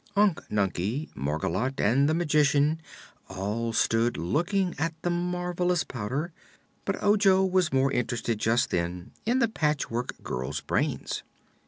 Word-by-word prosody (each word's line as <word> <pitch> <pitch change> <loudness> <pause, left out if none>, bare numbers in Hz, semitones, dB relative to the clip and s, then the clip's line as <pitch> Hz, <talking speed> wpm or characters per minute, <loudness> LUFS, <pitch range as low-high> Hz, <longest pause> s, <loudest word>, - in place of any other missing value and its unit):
Unc 200 -4 +3
Nunkie, 105 - -1
Margolotte 85 - -2
and 135 +7 +3
the 155 - +2
Magician 150 -1 +3 0.5
all 105 +5 -2
stood 115 +1 +2
looking 175 - 0
at 165 +1 -1
the 175 - +1
marvelous 180 0 0
Powder, 135 +9 -4 0.5
but - - -2
Ojo 200 -2 +5
was 185 -3 +2
more 135 +1 +2
interested 120 -3 -1
just 115 +3 +2
then 90 +1 -2 0.2
in 245 +2 +3
the 235 -3 +3
Patchwork 150 - -1
Girl's 65 +1 -3
brains. - - -1
140 Hz, 130 wpm, -27 LUFS, 115-175 Hz, 0.5 s, Ojo